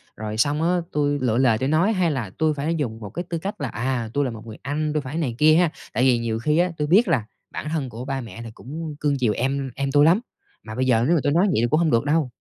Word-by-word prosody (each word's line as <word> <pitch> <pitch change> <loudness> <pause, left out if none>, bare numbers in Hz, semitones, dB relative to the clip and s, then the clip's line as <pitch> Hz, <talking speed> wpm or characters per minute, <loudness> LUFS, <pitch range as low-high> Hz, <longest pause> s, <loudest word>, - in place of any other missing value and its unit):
rồi 110 0 -5
xong 145 +6 +1
á 175 +2 +2
tui 145 -1 0
lựa 120 -3 +1
lời 125 -4 +4
tui 130 +4 -1
nói, 170 +8 +3
hay 180 -5 +1
là 125 -8 -3
tui 155 -1 +2
phải 150 +3 -2
dùng 120 -8 -3
một 105 -3 -7
cái 170 - -4
tư 170 - -2
cách 190 +1 -5
là, 140 - -1
à, 120 0 -2
tui 145 0 +1
là 130 - -2
một 110 0 -10
người 110 - -9
anh, 150 +3 -2
tui 155 - 0
phải 140 +3 -6
này 135 -8 -1
kia 155 +3 +6
ha? 175 0 +4 0.2
Tại 125 - +1
vì 130 -2 +4
nhiều 115 -1 -2
khi 150 +6 +1
á 175 +1 +2
tui 150 - -1
biết 200 +10 +5
là 115 -5 +1 0.3
bản 150 - -5
thân 150 -5 -2
của 120 +2 -7
ba 135 -1 -3
mẹ 115 -1 -9
thì 115 - -8
cũng 155 +5 -7
cưng 145 -1 +1
chiều 120 -4 +2
em 135 +2 -2
em 140 0 -2
tui 145 +1 +5
lắm, 170 +6 +5 0.4
mà 110 0 -8
bây 130 - 0
giờ 115 -3 +3
nếu 170 - +4
mà 160 - +2
tui 145 - +2
nói 175 +5 +4
vậy 110 - +1
thì 120 - +2
cũng 155 - +3
hông 170 -2 +2
được 115 +2 +2
đâu. 150 -2 +1
140 Hz, 305 wpm, -23 LUFS, 120-155 Hz, 0.4 s, kia